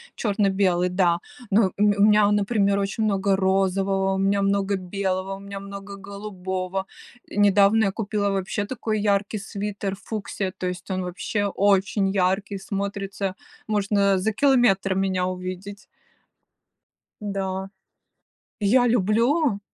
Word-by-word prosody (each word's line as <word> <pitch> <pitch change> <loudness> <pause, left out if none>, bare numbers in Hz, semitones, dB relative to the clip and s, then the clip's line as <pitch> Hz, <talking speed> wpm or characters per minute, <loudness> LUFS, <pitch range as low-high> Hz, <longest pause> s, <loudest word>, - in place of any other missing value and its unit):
черно-белый, 195 -4 +1
да. 180 -2 +2 0.3
Но 195 -2 +3
у - - -2
ме 205 -1 +4
у 200 - +4
меня, 210 0 +5
а 205 - +3
например, 200 -1 +2
очень 200 +3 -1
много 200 -2 +2
розового, 195 0 +1
у - - -2
меня 195 +1 +2
много 200 0 +1
белого, 190 0 -2
у - - -11
меня 200 0 -7
много 200 0 -8
голубого. 190 -1 -5 0.4
Э, - - -10
недавно 205 +2 +4
я 195 - +1
купила 205 -1 -1
вообще 195 +1 -2
такой 215 -2 -2
яркий 205 +1 +1
свитер 200 -1 -4
фуксия, 200 -3 -4
то 185 - -3
есть 180 0 -6
он 185 0 -1
вообще 190 +3 -2
очень 195 0 +2
ярко 195 +1 0
смотрится, 195 0 -4 0.3
можно 200 -2 +2
за 200 +4 0
километр 225 -7 +3
меня 190 -1 0
увидеть. 185 +2 -6 1.4
Да. 195 -2 -3 0.9
Я 245 +5 +4
люблю! 230 - +2
200 Hz, 135 wpm, -24 LUFS, 190-205 Hz, 1.4 s, меня